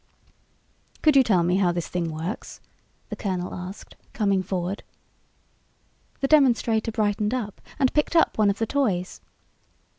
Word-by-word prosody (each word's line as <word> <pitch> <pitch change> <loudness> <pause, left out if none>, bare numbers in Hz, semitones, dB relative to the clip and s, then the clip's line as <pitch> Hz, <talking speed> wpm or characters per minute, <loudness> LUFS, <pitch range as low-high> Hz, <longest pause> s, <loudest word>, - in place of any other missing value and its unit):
"Could 305 -2 +5
you 270 - +8
tell 195 -9 +3
me 180 +2 +2
how 185 -3 +3
this 175 -1 -3
thing 170 -2 -2
works?" 160 +6 -6 0.5
the - - -4
colonel 185 -3 -3
asked, 185 +2 -8 0.2
coming 200 -3 +1
forward. 185 +1 -3 1.4
The 275 - +2
demonstrator 235 -6 +3
brightened 210 +1 0
up 210 -5 -5 0.2
and 265 -3 +2
picked 300 +2 +1
up 330 - +4
one 210 -2 +3
of 200 - 0
the 225 - 0
toys. 215 -9 -1
205 Hz, 145 wpm, -25 LUFS, 180-235 Hz, 1.4 s, you